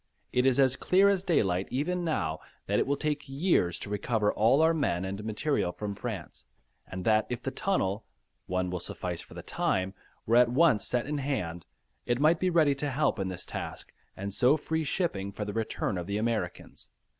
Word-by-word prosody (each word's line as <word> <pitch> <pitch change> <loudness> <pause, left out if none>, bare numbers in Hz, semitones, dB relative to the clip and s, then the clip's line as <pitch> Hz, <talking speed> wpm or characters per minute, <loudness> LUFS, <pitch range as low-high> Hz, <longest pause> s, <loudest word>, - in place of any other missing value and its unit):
It 125 +1 +3
is 130 0 +3
as 130 -2 +5
clear 190 +8 +4
as 195 -2 +2
daylight 95 - +1
even 175 +8 -1
now, 80 - -1 0.3
that - - +1
it - - +1
will 140 0 +1
take 150 -2 -2
years 135 - +2
to 100 - -7
recover 105 0 0
all 125 +8 +4
our 165 +1 +4
men 95 - 0
and 100 +2 -5
material 110 -2 0
from 105 +2 -5
France, 100 - -6 0.4
and 95 -1 -6
that 110 -1 +3
if 125 0 -4
the 135 - -2
tunnel 110 - -1 0.4
(one 90 0 -1
will 90 - -2
suffice - - -4
for - - -14
the - - -7
time), 95 +1 -1 0.3
were 115 +2 +4
at 120 -1 +6
once 130 -4 +3
set 120 -1 0
in 145 +1 -2
hand, 90 - -3 0.4
it 120 0 +1
might 160 +3 +4
be 185 - +2
ready 160 -5 +4
to 145 +1 -2
help 135 -4 +1
in 95 - -1
this 90 -1 -5
task - - -6 0.2
and 100 +1 -4
so 130 +8 +4
free 160 +1 -2
shipping 135 - -1
for 105 +1 -5
the 105 - -4
return 110 -3 -2
of 85 - -6
the 100 +1 -1
Americans. 115 0 -3
120 Hz, 200 wpm, -29 LUFS, 100-150 Hz, 0.4 s, at